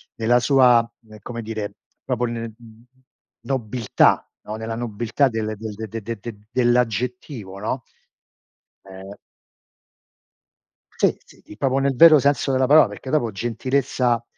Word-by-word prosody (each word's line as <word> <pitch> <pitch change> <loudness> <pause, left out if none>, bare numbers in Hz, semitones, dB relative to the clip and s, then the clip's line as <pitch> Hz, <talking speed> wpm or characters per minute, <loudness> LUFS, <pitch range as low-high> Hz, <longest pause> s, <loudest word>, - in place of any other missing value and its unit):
nella 120 +2 +3
sua, 125 -2 +5 0.3
ehm, 110 0 -13
come 120 +1 -6
dire, 110 -2 -5 0.3
proprio 125 - -1
n 115 -1 -5 0.9
nobiltà, 120 -2 +1 0.2
no, 105 - -4
nella 110 +1 -5
nobiltà 120 +4 0
del 110 -2 -3
de 110 +1 -6
de 115 +2 -5
de 110 +1 -8
dell'aggettivo, 120 -3 -1
no? 115 +5 -3 1.0
Eh. 95 +1 -10 1.8
Sì, - - +2
sì, - - -20 0.2
proprio 135 +2 +1
nel 135 -1 0
vero 155 +3 +8
senso 140 0 +1
della 130 0 +2
parola 150 -1 +7
perché 105 +6 -9
dopo 125 -6 +1
gentilezza, 120 +2 -1
120 Hz, 120 wpm, -22 LUFS, 110-130 Hz, 1.8 s, vero